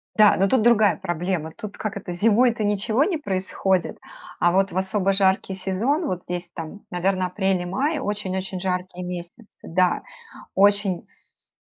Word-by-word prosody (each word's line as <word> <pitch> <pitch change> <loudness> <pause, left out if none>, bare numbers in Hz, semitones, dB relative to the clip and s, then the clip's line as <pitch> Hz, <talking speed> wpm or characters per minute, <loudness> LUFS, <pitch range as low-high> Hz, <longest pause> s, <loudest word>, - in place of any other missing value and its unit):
Да, 210 -2 +6
но 195 - +3
тут 255 +3 +3
другая 215 -4 +5
проблема. 175 -2 -2
Тут 210 -1 -8
как 215 -1 -4
это: 200 -2 -6
зимой-то 225 +4 +3
ничего 210 +5 +1
не 350 0 0
происходит, 190 - -1 0.4
а 175 - +4
вот 195 +2 +2
в 175 - -4
особо 190 +1 +1
жаркий 190 0 +2
сезон, 210 - 0
вот 180 - -2
здесь 175 0 -5
там, 165 +4 -7
наверно, 185 +1 +1
апрель 190 0 0
и - - -4
май, 275 - 0
очень-очень 195 -6 -3
жаркие 180 -1 -3
месяцы. 180 +5 -9
Да, 180 +1 +2 0.5
очень 200 -2 +3
с - - -7
190 Hz, 160 wpm, -23 LUFS, 180-210 Hz, 0.5 s, Да